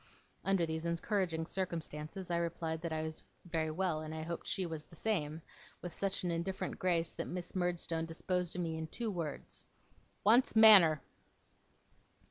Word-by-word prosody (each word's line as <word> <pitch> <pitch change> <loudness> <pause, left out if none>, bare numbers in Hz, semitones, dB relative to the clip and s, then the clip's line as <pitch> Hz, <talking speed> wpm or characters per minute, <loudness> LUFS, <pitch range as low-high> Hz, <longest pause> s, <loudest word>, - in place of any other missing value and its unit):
Under 195 -3 +2
these 160 +1 -3
encouraging 170 -1 0
circumstances, 170 0 -4
I 170 - +2
replied 165 -1 -2
that 170 -1 -3
I 155 0 -1
was 160 0 -5 0.2
very 160 -2 -1
well, 160 -1 -1
and 155 0 -6
that - - -5
I 155 - -4
hoped 170 +1 -5
she 190 - 0
was 160 -3 -5
the 165 - -15
same; 160 -6 -1 0.4
with 175 -2 -5
such 195 +3 0
an 175 - 0
indifferent 170 +6 -3
grace, 175 -4 +1
that - - -4
Miss 180 0 -5
Murdstone 170 -2 -1
disposed 180 +1 -2
of 180 - -1
me 160 -1 -2
in 160 - -4
two 225 +6 -2
words: 165 -6 -5 0.6
'Wants 230 +5 +5
manner! 195 -9 +9
170 Hz, 170 wpm, -34 LUFS, 160-185 Hz, 0.6 s, manner